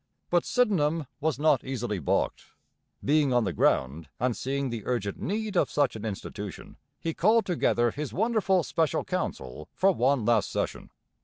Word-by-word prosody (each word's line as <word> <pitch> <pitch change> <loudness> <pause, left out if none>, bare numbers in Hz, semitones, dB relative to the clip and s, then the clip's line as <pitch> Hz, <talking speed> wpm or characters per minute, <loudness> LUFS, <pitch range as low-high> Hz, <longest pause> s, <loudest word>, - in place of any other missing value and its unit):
But 175 -1 +3
Sydenham 165 - +2
was 155 -2 0
not 145 -3 +3
easily 120 -6 -3
balked. 75 - -1 0.6
Being 145 -1 +3
on 120 -1 +3
the 95 -4 -2
ground 70 +4 +1
and 125 -1 +1
seeing 135 0 -2
the 115 -2 -4
urgent 105 -6 -2
need 215 +1 -3
of - - +3
such 145 -5 +1
an 110 0 -6
institution, 105 -3 -6 0.2
he 165 - -2
called 220 +7 +3
together 120 -9 +1
his 150 +2 -5
wonderful 200 -4 +2
Special 160 -2 0
Council 65 +4 -4
for 195 +1 +4
one 130 - +1
last 115 -2 +2
session. - - -3
140 Hz, 160 wpm, -27 LUFS, 115-175 Hz, 0.6 s, for